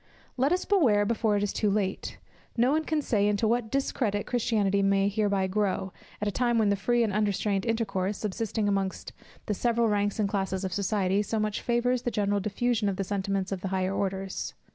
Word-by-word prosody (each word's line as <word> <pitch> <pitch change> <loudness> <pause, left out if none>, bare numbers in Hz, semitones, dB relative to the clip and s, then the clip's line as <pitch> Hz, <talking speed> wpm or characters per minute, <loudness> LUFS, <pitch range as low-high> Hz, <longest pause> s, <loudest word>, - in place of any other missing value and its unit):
Let 270 +3 +1
us 365 +1 +1
beware 250 - +3
before 215 -1 +1
it - - 0
be - - +2
too 210 - 0
late. 195 -1 -2 0.4
No 245 +3 +4
one 315 +1 +1
can 310 -2 0
say 205 -5 +2
into 210 +2 +1
what 235 0 0
discredit 225 -5 -1
Christianity 210 -5 +1
may 195 0 +3
hereby 200 -2 +1
grow, 190 -1 -1 0.3
at 210 - -2
a - - +1
time 240 +1 +1
when 215 -2 +3
the 200 - +3
free 240 +4 +1
and 215 -3 -1
unrestrained 205 0 0
intercourse, 205 -4 -1
subsisting 215 +1 -2
amongst 195 -1 -2 0.3
the 210 - -1
several 235 +2 +1
ranks 205 -1 0
and 210 -2 +1
classes 195 -1 -2
of 190 -1 -3
society, 200 0 +1
so 220 +1 -2
much 215 0 -1
favours 245 +1 +1
the 245 - -1
general 205 -2 0
diffusion 210 +1 0
of 195 - -2
the 195 - -2
sentiments 195 0 -2
of 190 -2 -3
the 195 - -3
higher 190 0 -1
orders. 195 -1 -3
205 Hz, 205 wpm, -28 LUFS, 195-230 Hz, 0.4 s, No